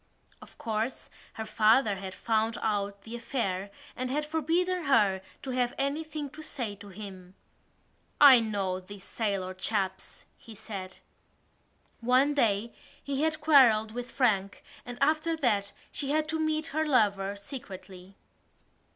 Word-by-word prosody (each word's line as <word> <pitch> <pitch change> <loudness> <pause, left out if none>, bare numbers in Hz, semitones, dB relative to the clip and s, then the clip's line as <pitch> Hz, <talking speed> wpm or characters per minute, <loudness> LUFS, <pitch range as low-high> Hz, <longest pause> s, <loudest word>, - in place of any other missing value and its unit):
Of - - -15
course, 225 +3 -3 0.2
her 220 - -5
father 215 0 +3
had 190 -1 -7
found 225 +1 0
out 200 -2 -1
the 225 +1 -7
affair 205 -6 -2 0.3
and 255 0 -3
had 295 +3 -1
forbidden 335 +3 0
her 205 -8 +3 0.2
to 265 - -4
have 250 -1 0
anything 295 +2 -2
to 305 +2 -10
say 245 -8 -3
to 205 - -12
him. 190 -2 -10 0.8
"I 275 -4 +10
know 200 -5 -1
these 190 +1 -11
sailor 195 -5 -2
chaps," 190 0 -3
he 225 - -12
said. 195 -3 -7 1.0
One 255 +5 +3
day 230 -4 +1 0.3
he 280 0 -2
had 315 -1 0
quarrelled 245 -8 +5
with 245 +2 -6
Frank 200 -7 0 0.2
and 245 0 -6
after 310 +3 +2
that 205 -8 +1 0.2
she 275 - -2
had 305 +1 +1
to 320 0 -1
meet 310 0 0
her 315 +1 +1
lover 205 -8 +2
secretly. 195 -4 -9
225 Hz, 140 wpm, -29 LUFS, 200-280 Hz, 1.0 s, I